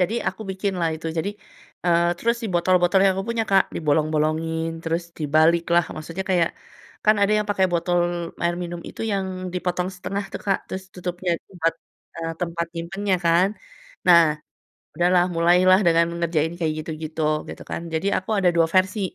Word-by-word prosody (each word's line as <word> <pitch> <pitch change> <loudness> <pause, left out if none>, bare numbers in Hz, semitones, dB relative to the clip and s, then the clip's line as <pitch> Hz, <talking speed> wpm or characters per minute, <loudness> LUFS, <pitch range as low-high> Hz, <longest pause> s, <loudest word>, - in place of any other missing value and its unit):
Jadi 185 +5 +1
aku 220 - -7
bikinlah 190 -3 -1
itu, 160 - -8
jadi 195 +5 -1 0.5
eee, 170 -1 +3
terus 235 +4 +1
si - - -1
botol-botol 180 +2 +3
yang 195 - +5
aku 195 - -2
punya, 230 -1 0
Kak, 195 -1 +5
dibolong-bolongin, 155 +1 0
terus 165 +1 -1 0.2
dibaliklah. 165 +3 +3
Maksudnya 165 +4 -5
kayak 170 -3 +3 0.6
kan 215 - +7
ada 200 - +3
yang 210 - -1
pakai 190 -2 +3
botol 175 +1 +1 0.4
air 170 0 +1
minum 175 0 -5
itu - - -11
yang 195 -1 -1 0.3
dipotong 180 0 -1
setengah 200 +2 -4
tuh, - - -5
Kak, 195 -1 +2
terus 190 - -5
tutupnya 180 0 -3 0.2
tempat, 165 -3 0 0.4
eee, 165 0 -3
tempat 170 -1 -2
nyimpennya 190 +4 -2
kan. 170 +3 +4 0.6
Nah, 170 -2 +8 0.7
udahlah 175 0 +3
mulailah 180 +3 +5
dengan 170 0 +5
mengerjain 165 -2 0
kayak 160 -2 +1
gitu-gitu, 160 0 -5 0.3
gitu - - -8
kan. - - -3
Jadi 160 +4 -1
aku 190 - -4
ada 185 -2 +4
dua 165 -1 +5
versi, 185 +2 +2
175 Hz, 165 wpm, -23 LUFS, 165-185 Hz, 0.7 s, Nah